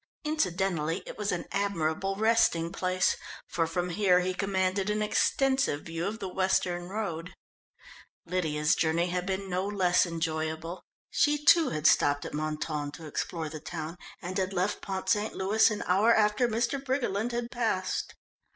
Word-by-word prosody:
Incidentally 185 Hz, -, 0 dB
it -, -, -8 dB
was 210 Hz, 0 st, -2 dB
an 180 Hz, -, -2 dB
admirable 195 Hz, -1 st, -1 dB
resting 210 Hz, -6 st, +2 dB
place, 185 Hz, -1 st, +1 dB, 0.3 s
for 165 Hz, -1 st, -1 dB
from 175 Hz, +2 st, -2 dB
here 180 Hz, -1 st, +4 dB
he 185 Hz, +1 st, -1 dB
commanded 190 Hz, +1 st, 0 dB
an 210 Hz, 0 st, 0 dB
extensive 265 Hz, -, +1 dB
view 165 Hz, +2 st, -3 dB
of 215 Hz, +2 st, -3 dB
the 195 Hz, -, -5 dB
western 185 Hz, -2 st, 0 dB
road. 180 Hz, -5 st, -4 dB, 0.9 s
Lydia's 155 Hz, -4 st, +1 dB
journey 170 Hz, +2 st, +1 dB
had 180 Hz, +1 st, -2 dB
been 195 Hz, 0 st, -2 dB
no 185 Hz, 0 st, -1 dB
less 185 Hz, -3 st, +3 dB
enjoyable. 160 Hz, +1 st, -3 dB, 0.3 s
She, 295 Hz, 0 st, +2 dB
too, 330 Hz, +2 st, +6 dB
had 155 Hz, -1 st, -4 dB
stopped 145 Hz, -2 st, +4 dB
at -, -, -6 dB
Mentone 150 Hz, -1 st, -2 dB
to 165 Hz, -, -9 dB
explore 160 Hz, +2 st, -3 dB
the 155 Hz, 0 st, -7 dB
town, 160 Hz, +1 st, -6 dB, 0.3 s
and 180 Hz, +2 st, -4 dB
had 190 Hz, +1 st, -1 dB
left 185 Hz, +2 st, -1 dB
Pont 190 Hz, -1 st, -4 dB
St. 210 Hz, +1 st, +1 dB
Louis 205 Hz, +4 st, +4 dB
an 210 Hz, -2 st, -3 dB
hour 200 Hz, +6 st, +4 dB
after 215 Hz, +2 st, +3 dB
Mr. 235 Hz, +4 st, -1 dB
Briggerland 245 Hz, -4 st, -1 dB
had 240 Hz, 0 st, -3 dB
passed. 225 Hz, -6 st, -1 dB
185 Hz, 160 wpm, -29 LUFS, 165-210 Hz, 0.9 s, too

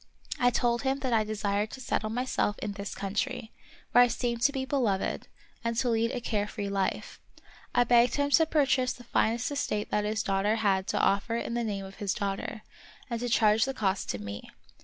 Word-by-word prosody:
I 245 Hz, -, +5 dB
told 240 Hz, 0 st, +1 dB
him 270 Hz, 0 st, 0 dB
that 260 Hz, -3 st, -1 dB
I 220 Hz, -1 st, +4 dB
desired 210 Hz, 0 st, -1 dB
to -, -, -7 dB
settle 220 Hz, -4 st, -1 dB
myself 235 Hz, -3 st, -1 dB
in 210 Hz, -, -4 dB
this 200 Hz, 0 st, -6 dB
country, 220 Hz, +4 st, -3 dB, 0.4 s
where 245 Hz, -, +8 dB
I -, -, +4 dB
seemed 235 Hz, 0 st, -2 dB
to 280 Hz, -, +4 dB
be 265 Hz, -2 st, -3 dB
beloved, 240 Hz, -9 st, -1 dB, 0.4 s
and 230 Hz, 0 st, -1 dB
to 245 Hz, +1 st, +1 dB
lead 230 Hz, 0 st, +2 dB
a 250 Hz, -, -2 dB
care 210 Hz, -3 st, -1 dB
free 200 Hz, -1 st, -4 dB
life. 195 Hz, -1 st, -2 dB, 0.5 s
I 245 Hz, -, +6 dB
begged 240 Hz, 0 st, +4 dB
him 285 Hz, 0 st, 0 dB
to 320 Hz, +2 st, +5 dB
pur 300 Hz, -3 st, +3 dB
chase 255 Hz, -1 st, +1 dB
the 245 Hz, -, -13 dB
finest 235 Hz, +2 st, 0 dB
estate 245 Hz, -7 st, -2 dB
that 210 Hz, -, +2 dB
the 215 Hz, +1 st, -1 dB
country 200 Hz, +2 st, +1 dB
had 195 Hz, -3 st, +1 dB
to -, -, 0 dB
offer 200 Hz, +4 st, +1 dB
in 235 Hz, -, -3 dB
the 240 Hz, 0 st, 0 dB
name 200 Hz, -3 st, -3 dB
of 195 Hz, 0 st, -11 dB
his 200 Hz, -3 st, -1 dB
daughter, 200 Hz, +1 st, -3 dB, 0.5 s
and 235 Hz, -, -1 dB
to 245 Hz, +1 st, -2 dB
charge 220 Hz, -1 st, +4 dB
the 270 Hz, 0 st, -4 dB
cost 195 Hz, -4 st, -1 dB
to -, -, -1 dB
me. 100 Hz, 0 st, -7 dB
225 Hz, 215 wpm, -29 LUFS, 205-245 Hz, 0.5 s, where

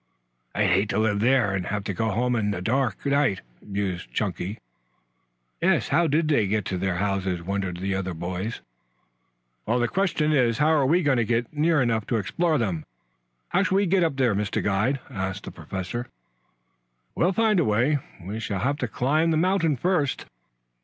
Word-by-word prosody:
"I'd 105 Hz, -3 st, +2 dB
hate 100 Hz, +3 st, +2 dB
to 100 Hz, -, -1 dB
live 110 Hz, -2 st, +1 dB
there 120 Hz, -3 st, +3 dB
and 95 Hz, -2 st, -2 dB
have 105 Hz, -1 st, -2 dB
to 100 Hz, -, -3 dB
go 110 Hz, +4 st, -1 dB
home 125 Hz, +4 st, 0 dB
in 105 Hz, -3 st, 0 dB
a -, -, -4 dB
dark 120 Hz, +3 st, -1 dB
night," 140 Hz, -8 st, +2 dB, 0.2 s
mused 95 Hz, -9 st, -3 dB
Chunky. 95 Hz, -, -3 dB, 1.0 s
"Yes, -, -, +2 dB
how 170 Hz, +4 st, +3 dB
did 155 Hz, +2 st, +1 dB
they 125 Hz, -10 st, +2 dB
get 105 Hz, 0 st, 0 dB
to 95 Hz, -, -2 dB
their 95 Hz, -1 st, -1 dB
houses?" 95 Hz, -2 st, -1 dB
wondered 95 Hz, -1 st, -2 dB
the 95 Hz, +2 st, -2 dB
other 95 Hz, -2 st, -3 dB
boys. 90 Hz, +6 st, -4 dB, 1.1 s
"The 120 Hz, 0 st, +2 dB
question 160 Hz, -1 st, +1 dB
is, 125 Hz, -6 st, +3 dB
how 150 Hz, +2 st, +3 dB
are 150 Hz, -4 st, +3 dB
we 170 Hz, +5 st, +3 dB
going 140 Hz, -3 st, +3 dB
to 120 Hz, -, +3 dB
get 115 Hz, +2 st, -1 dB
near 155 Hz, -1 st, +2 dB
enough 115 Hz, -3 st, 0 dB
to 115 Hz, -, +1 dB
explore 155 Hz, -, 0 dB
them? 95 Hz, -, -1 dB, 0.7 s
How 180 Hz, -, +2 dB
shall 190 Hz, -1 st, +1 dB
we 200 Hz, +1 st, +3 dB
get 185 Hz, 0 st, +3 dB
up 160 Hz, -4 st, 0 dB
there, 130 Hz, -5 st, +2 dB
Mr. 100 Hz, 0 st, -1 dB
Guide?" 110 Hz, +8 st, +1 dB
asked 95 Hz, -4 st, -4 dB
the -, -, -7 dB
Professor. 95 Hz, +6 st, -5 dB, 1.1 s
"We'll 175 Hz, -, +2 dB
find 215 Hz, 0 st, +2 dB
a -, -, +3 dB
way. 125 Hz, +7 st, +2 dB, 0.2 s
We 100 Hz, +6 st, -5 dB
shall 105 Hz, -4 st, -3 dB
have 140 Hz, +3 st, 0 dB
to 120 Hz, -, -1 dB
climb 150 Hz, +9 st, +1 dB
the 160 Hz, -, +2 dB
mountain, 170 Hz, -3 st, +2 dB
first." 155 Hz, -3 st, 0 dB
115 Hz, 185 wpm, -25 LUFS, 100-150 Hz, 1.1 s, there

